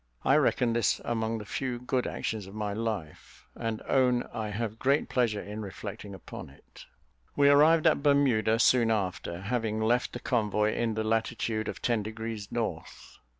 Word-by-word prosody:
I - - +5
reckon 120 -2 +2
this 115 -3 +2
among 115 -1 -1
the 105 - -7
few 125 +4 -3
good 125 +1 -1
actions 105 -4 -4
of 100 - -11
my 105 -1 -2
life, 105 -8 -5
and 115 -1 -4
own 125 -2 +3
I 110 -1 -3
have 110 +1 -4
great 140 +3 +2
pleasure 115 -5 0
in 105 +1 -6
reflecting 100 0 -7
upon 95 - -9
it. 70 - -17 0.5
We 140 0 +5
arrived 155 +3 +5
at - - +4
Bermuda 135 -7 +3
soon 120 0 +4
after, 95 -4 -2
having 110 +1 -1
left 120 +3 +1
the 120 - -5
convoy 105 -3 +1
in 115 -2 -1
the 110 - -1
latitude 110 -1 -1
of - - -6
ten 120 -3 +1
degrees 110 -1 -6
north. 110 -9 -5
110 Hz, 170 wpm, -29 LUFS, 105-120 Hz, 0.5 s, I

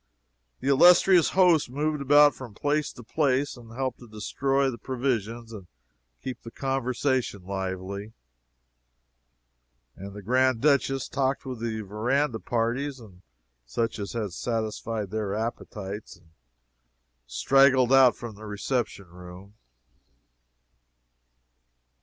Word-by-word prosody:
The - - -4
illustrious 175 +4 +6
host 175 -8 +5
moved 150 +3 -1
about 145 +1 +6
from 120 -6 -10
place 145 +3 0
to 120 - -12
place, 140 +2 0
and 115 -2 -14
helped 130 +1 -3
to 120 - -13
destroy 135 +6 0
the 120 - -9
provisions 120 -2 -3
and 95 -4 -10 0.6
keep 130 - -5
the 115 - -9
conversation 130 -4 -1
lively, 95 +2 -5 1.8
and 100 +1 -9
the 105 - -9
Grand 130 +2 +2
Duchess 135 -1 +2
talked 135 0 -1
with 130 -3 -6
the 110 -1 -3
verandah 115 +5 -1
parties 125 +5 -2
and 95 -6 -15 0.4
such 110 - -2
as 100 - -5
had 105 -6 -3
satisfied 110 -2 -3
their 105 -2 -2
appetites 105 -3 -5
and 85 -3 -25 1.0
straggled 130 - +4
out 130 -2 +7
from 120 -2 -8
the 105 +1 -11
reception 105 0 -2
room. 90 +3 -13
120 Hz, 115 wpm, -26 LUFS, 105-135 Hz, 1.8 s, out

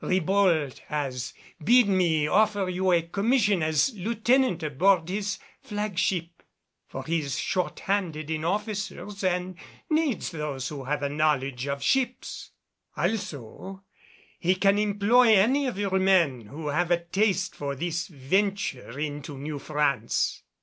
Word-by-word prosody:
Ribault 185 -6 +2
has 130 -4 -3 0.3
bid 240 +5 +6
me 175 -6 +2
offer 205 +1 +2
you 185 +1 0
a 170 -2 +3
commission 200 +2 +1
as 155 - +2
lieutenant 225 -1 +1
aboard 165 +4 +2
his 200 0 -2 0.2
flagship, 190 - -2 0.5
for 135 - -6
he 165 +2 +1
is 140 -3 -3
short 185 -2 -2
handed 165 -6 -2
in 155 -1 -2
officers 205 +1 -3
and 180 0 -1 0.3
needs 305 - +1
those 150 -5 -4
who 140 -3 -7
have 145 +2 -2
a 140 - 0
knowledge 140 -3 0
of 140 0 -3
ships; 260 -2 -1 0.5
also 190 - -4 0.6
he 185 +2 +2
can 195 +2 +3
employ 210 +3 +4
any 260 +8 +3
of 245 - -4
your 195 -2 0
men 170 - +2
who 150 +5 -6
have 170 +4 0
a 170 -1 +2
taste 190 0 0
for 140 -1 -4
this 170 +3 -2
venture 150 - -1
in 145 -1 -3
New 145 +2 -6
France." 140 -6 0
180 Hz, 135 wpm, -26 LUFS, 150-200 Hz, 0.6 s, bid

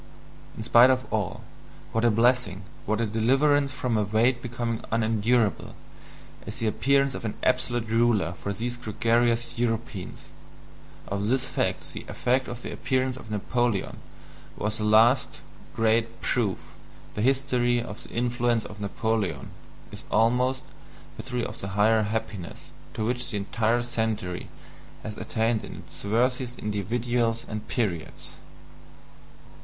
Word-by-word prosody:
In 110 - -4
spite 120 +2 +7
of 130 0 +2
all, 105 -5 -2 0.5
what 115 - 0
a 120 - +6
blessing, 115 -4 +2 0.2
what 110 +2 +1
a 115 - +2
deliverance 135 +6 +3
from 125 -3 -1
a - - +2
weight 115 +5 +2
becoming 120 -2 -3
unendurable, 115 -1 +1 0.7
is 105 - -4
the 115 - -1
appearance 140 +5 +2
of - - -6
an 110 - -3
absolute 120 -2 +1
ruler 110 -6 +2
for 95 +4 -5
these 120 +4 -3
gregarious 120 +1 +1
Europeans 115 -4 -3 0.8
of 100 +1 -2
this 130 +2 +2
fact - - -1
the - - -6
effect 130 +1 0
of 120 +1 -7
the - - -5
appearance 130 -1 0
of 115 - -11
Napoleon 110 +1 -1 0.6
was 105 +1 -2
the - - -1
last 115 +5 +4 0.3
great 115 +1 +1
proof 110 -7 0 0.6
the 105 - -3
history 125 -1 +2
of 110 -3 -6
the - - -12
influence 120 -1 0
of 105 0 -9
Napoleon 110 -1 -1 0.4
is - - -10
almost 125 +4 +2 0.5
the - - -6
history 125 -2 -3
of - - -7
the 95 - -4
higher 110 +2 +5
happiness 105 -4 -4 0.2
to 110 - -1
which 125 +1 -1
the 105 - -1
entire 115 +4 +1
century 110 -6 -2 0.6
has 105 - -5
attained 110 0 0
in - - -8
its 80 +1 -11
worthiest 125 +4 0
individuals 115 +3 -1
and 110 0 -6
periods. 95 - -3
115 Hz, 140 wpm, -26 LUFS, 110-125 Hz, 0.8 s, spite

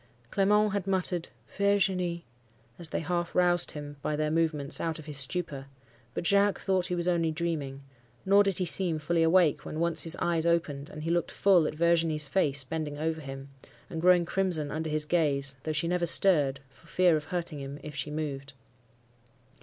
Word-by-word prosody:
Clement 210 +1 +2
had 200 -2 -3
muttered 180 -3 -2 0.2
'Virginie,' 190 -4 0 0.5
as 170 -2 -3
they - - -3
half 175 +1 -3
roused 175 -1 +2
him 145 -1 -8
by 150 - -2
their 155 0 -1
movements 155 -3 0
out 165 -1 -2
of 155 - -10
his 150 -2 0
stupor; 140 -1 -3 0.5
but - - -3
Jacques 200 +2 +3
thought 190 -2 0
he 180 - -2
was 175 0 -2
only 170 -2 +1
dreaming; 155 -4 -4 0.4
nor 200 +1 +5
did 195 -3 0
he 185 - 0
seem 170 +1 +3
fully 165 +2 -1
awake 165 -2 +3
when 155 - -6
once 170 -1 0
his 165 +1 +4
eyes 170 -2 0
opened, 160 -4 -1
and 155 - -9
he 165 - -2
looked 170 -1 0
full 180 -6 +3
at - - -5
Virginie's 165 -2 +2
face 145 -4 +2
bending 150 +1 -5
over 160 +1 -2
him, 135 -1 -9 0.4
and 160 - -4
growing 180 0 +4
crimson 175 -6 -1
under 160 +1 -3
his 155 0 +2
gaze, 140 -5 +1
though 155 - -1
she 155 +2 -1
never 175 0 0
stirred, 145 -7 +3
for 135 +5 -23
fear 180 -1 +3
of 150 -1 -3
hurting 170 -3 -4
him 140 +1 -7
if 150 - -8
she 145 +1 -3
moved. 145 -2 -5
165 Hz, 190 wpm, -28 LUFS, 150-180 Hz, 0.5 s, nor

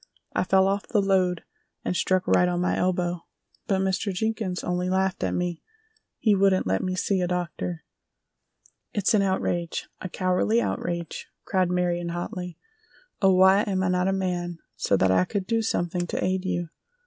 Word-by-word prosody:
"I - - +1
fell 190 +1 +4
off 200 +1 -1
the 215 - +2
load 190 -3 +2 0.4
and - - -1
struck 185 +1 +1
right 180 0 +4
on 175 0 -1
my 180 - +1
elbow, 175 -2 -1 0.4
but 190 -1 +1
Mr. 190 +1 0
Jenkins 210 -1 -2
only 180 0 -1
laughed 190 0 0
at - - 0
me—he 235 - -3
wouldn't 195 -1 +3
let 95 +1 +1
me 185 0 -2
see 190 0 0
a 180 - +1
doctor." 175 -1 -3 1.1
"It's 205 +2 +1
an 210 - +4
outrage, 175 -3 -1
a 185 - -5
cowardly 185 +6 +1
outrage!" 170 -6 -3 0.2
cried 185 -2 +1
Marion, 175 -1 0
hotly. 180 +1 -5 0.6
"Oh, 190 -2 +5
why 190 +2 +6
am 190 -3 -1
I 185 - +1
not 180 0 +1
a - - +2
man 180 -3 -2 0.2
so 100 -1 +1
that 95 0 +3
I 95 -1 +4
could 190 - -3
do 225 +2 +1
something 175 -4 -1
to - - -2
aid 185 0 -1
you!" 175 -2 -2
185 Hz, 170 wpm, -26 LUFS, 175-195 Hz, 1.1 s, why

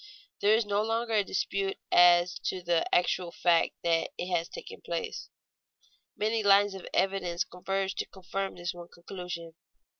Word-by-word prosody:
There 210 +2 +5
is 225 0 +1
no 205 0 +1
longer 225 +1 -1
any 210 -2 +3
dispute 195 0 -1
as 175 0 +6
to 185 -1 -2
the 170 -1 +2
actual 180 0 +1
fact 170 -1 +2
that 165 -1 +2
it 180 0 -1
has 170 0 -1
taken - - -9
place. 450 -2 -4 0.9
Many 220 +1 +1
lines 200 0 +5
of 190 - -8
evidence 185 -3 0
converge 195 +2 -3
to - - -2
confirm 195 +1 -5
this 175 -1 -4
one 175 -1 -10
conclusion. 175 -2 -7
190 Hz, 155 wpm, -29 LUFS, 175-200 Hz, 0.9 s, as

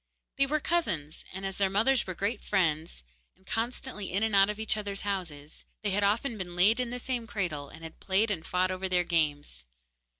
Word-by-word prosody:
They 275 - +5
were 305 +2 +1
cousins, 175 - -1
and 190 +1 -6
as 195 -1 -4
their 195 -1 +3
mothers 225 +6 +3
were 185 - -4
great 205 +4 -1
friends, 160 - 0 0.3
and 190 - -29
constantly 225 -2 -2
in 195 +4 +1
and 220 -2 +2
out 195 +1 +6
of 210 0 -3
each 220 0 +1
other's 200 -2 -3
houses, 165 -8 -4 0.2
they 205 - +1
had 200 +2 +1
often 220 +3 +1
been 175 -2 -5
laid 205 +7 +5
in 250 -1 0
the 245 - -3
same 245 -2 -3
cradle, 155 -10 -3
and 160 - -12
had 160 0 -9
played 205 +3 +1
and 165 -6 -2
fought 185 +2 +1
over 185 0 -2
their 180 -1 +3
games. 145 - 0
195 Hz, 210 wpm, -29 LUFS, 175-220 Hz, 0.3 s, out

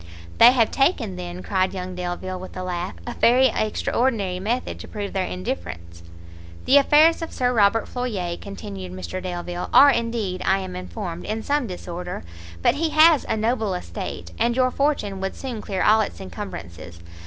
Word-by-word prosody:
"They 235 - +10
have 235 -4 +3
taken, 270 - +1
then," 180 0 -7
cried 190 -1 0
young 185 0 -5
Delvile 180 +1 -4
with 185 0 -9
a 185 - -4
laugh, 180 0 -4
"a 240 - -4
very 255 +3 +4
extraordinary 215 -3 0
method 230 +6 -2
to - - -9
prove 205 -2 -5
their 190 -1 -1
indifference!" 85 -2 -6 0.6
"The 275 - +6
affairs 305 +4 +5
of 330 - -5
Sir 250 -1 0
Robert 220 0 +3
Floyer," 205 -9 -3
continued 195 -1 -8
Mr 185 0 -5
Delvile, 175 -1 -4
"are 285 +1 +8
indeed, 230 -6 -2
I 190 - +3
am 185 -1 -6
informed, 180 -2 -6
in 220 +1 -3
some 285 -3 0
disorder; 180 -1 -6 0.4
but - - +5
he 320 +2 0
has 310 -1 +5
a - - +1
noble 220 -3 0
estate, 185 +2 -6
and 235 +1 +2
your 255 0 +2
fortune 230 -10 -1
would 195 - -3
soon 245 -5 -5
clear 190 -3 -2
all 220 +1 +5
its 215 - -4
incumbrances. 85 - -8
200 Hz, 175 wpm, -23 LUFS, 180-240 Hz, 0.6 s, They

